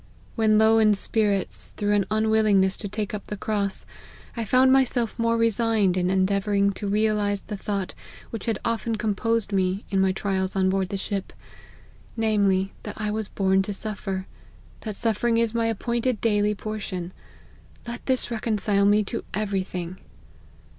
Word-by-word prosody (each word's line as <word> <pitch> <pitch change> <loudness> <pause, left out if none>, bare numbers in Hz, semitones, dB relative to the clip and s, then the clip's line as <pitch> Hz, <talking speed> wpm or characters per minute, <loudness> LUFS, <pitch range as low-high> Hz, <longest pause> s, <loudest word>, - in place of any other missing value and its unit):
When 215 -1 +3
low 220 +1 +5
in 215 -1 +5
spirits, 205 -1 0
through 205 -1 +1
an 205 -2 +2
unwillingness 215 -3 +3
to 205 - -4
take 215 +1 -4
up 210 - -6
the 210 - -5
cross, 200 -1 -2 0.5
I 230 - -2
found 255 +4 +4
myself 245 -4 +2
more 230 0 +2
resigned 225 -4 +2
in 180 -1 +1
endeavouring 200 +1 +2
to 200 +1 -5
realise 205 -1 +1
the 210 - -6
thought 200 -1 -3 0.4
which 225 0 -6
had 225 -3 +1
often 230 0 -1
composed 215 0 -1
me 190 +1 0
in 195 -1 +2
my 190 0 +3
trials 190 0 -1
on 190 -1 +2
board 190 -1 0
the 200 - -2
ship; 195 0 -3 0.9
namely, 200 -4 +2
that 210 - -8
I 210 -1 -1
was 215 -1 -2
born 190 -1 +2
to 200 +1 -3
suffer; 195 -3 -3 0.5
that 215 -3 -6
suffering 230 +1 +1
is 230 -1 +1
my 230 -1 +1
appointed 235 +2 -1
daily 210 -2 +2
portion; 195 -4 -5 0.7
let 240 0 -6
this 260 -2 0
reconcile 210 -3 +1
me 205 +1 +4
to 195 - -4
every 200 -2 0
thing 180 -1 -6
210 Hz, 160 wpm, -25 LUFS, 195-225 Hz, 0.9 s, low